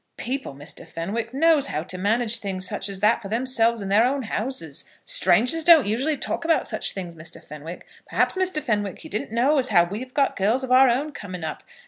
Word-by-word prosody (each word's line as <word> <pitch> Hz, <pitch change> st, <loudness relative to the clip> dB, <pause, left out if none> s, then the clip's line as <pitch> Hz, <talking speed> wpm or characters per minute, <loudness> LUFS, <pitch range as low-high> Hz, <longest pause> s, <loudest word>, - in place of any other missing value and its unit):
People, 260 Hz, -, -4 dB
Mr. 145 Hz, +4 st, -6 dB
Fenwick, 215 Hz, +8 st, -4 dB
knows 295 Hz, +1 st, +3 dB
how 155 Hz, -, -3 dB
to 185 Hz, -, -7 dB
manage 220 Hz, +4 st, +1 dB
things 190 Hz, -2 st, -2 dB
such -, -, -2 dB
as 195 Hz, -1 st, -6 dB
that 220 Hz, +3 st, +3 dB
for 200 Hz, -, -7 dB
themselves 230 Hz, -1 st, +1 dB
in 195 Hz, -, -5 dB
their 205 Hz, +3 st, +4 dB
own 265 Hz, +2 st, 0 dB
houses. 215 Hz, -, -4 dB, 0.2 s
Strangers 240 Hz, -, +2 dB
don't 325 Hz, -4 st, +7 dB
usually 265 Hz, +9 st, 0 dB
talk 340 Hz, -, -3 dB
about 330 Hz, 0 st, +2 dB
such -, -, -2 dB
things, 180 Hz, -3 st, -6 dB
Mr. 165 Hz, 0 st, -11 dB
Fenwick. 150 Hz, +4 st, -10 dB, 0.2 s
Perhaps, -, -, +1 dB
Mr. 370 Hz, -5 st, 0 dB
Fenwick, 205 Hz, -4 st, -2 dB
you -, -, -11 dB
didn't 210 Hz, +1 st, -4 dB
know 265 Hz, +6 st, +2 dB
as 260 Hz, -, +3 dB
how 175 Hz, -7 st, +5 dB
we 195 Hz, +5 st, -5 dB
have 255 Hz, +1 st, -10 dB
got 280 Hz, -2 st, +1 dB
girls 220 Hz, +7 st, +1 dB
of 255 Hz, -, -4 dB
our 260 Hz, +1 st, +6 dB
own 275 Hz, +6 st, 0 dB
coming 185 Hz, -, -8 dB
up. 155 Hz, -, -5 dB
225 Hz, 215 wpm, -23 LUFS, 190-265 Hz, 0.2 s, don't